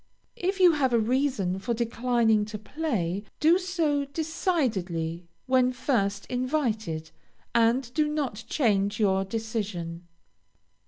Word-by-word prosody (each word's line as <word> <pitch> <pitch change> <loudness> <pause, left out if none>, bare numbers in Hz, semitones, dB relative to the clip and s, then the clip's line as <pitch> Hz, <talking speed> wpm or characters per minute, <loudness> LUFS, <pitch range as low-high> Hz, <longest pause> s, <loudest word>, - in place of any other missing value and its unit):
If 380 +2 0
you 360 -2 +7
have 275 -5 +1
a 235 - +5
reason 230 -6 0
for 235 +4 -2
declining 230 -2 +2
to 210 0 -6
play, 210 - -2 0.2
do 330 +4 +5
so 330 -6 0
decidedly 215 - -2 0.2
when 255 -1 +3
first 220 -6 0
invited, 230 - -2 0.4
and 235 +2 +2
do 305 0 +2
not 275 -8 -2
change 205 -6 +1
your 195 -2 +3
decision. 195 -5 -4
235 Hz, 115 wpm, -27 LUFS, 200-285 Hz, 0.4 s, you